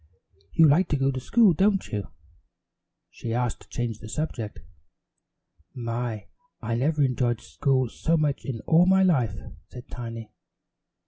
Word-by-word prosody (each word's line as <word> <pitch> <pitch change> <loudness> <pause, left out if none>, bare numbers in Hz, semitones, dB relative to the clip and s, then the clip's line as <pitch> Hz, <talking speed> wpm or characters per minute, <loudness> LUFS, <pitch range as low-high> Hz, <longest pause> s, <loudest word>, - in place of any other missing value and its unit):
"You 160 - +6
like 165 +6 +4
to 145 - 0
go 135 0 +1
to 130 - -4
school, 210 - +4
don't 195 +3 +2
you?" 105 -3 -3 1.0
she 115 -1 -5
asked 120 -1 -1
to - - -18
change 120 -3 -3
the 110 - -10
subject. 115 -6 -4 1.1
"My, 115 -2 -3 0.3
I 115 - -3
never 145 +5 +1
enjoyed 125 -3 +1
school 130 -3 0
so 165 +8 0
much 150 -3 0
in 120 -5 -5
all 170 +3 +4
my 190 0 +5
life," 125 - +2 0.3
said 125 -1 -12
Tiny. 115 -2 -7
130 Hz, 145 wpm, -26 LUFS, 115-155 Hz, 1.1 s, You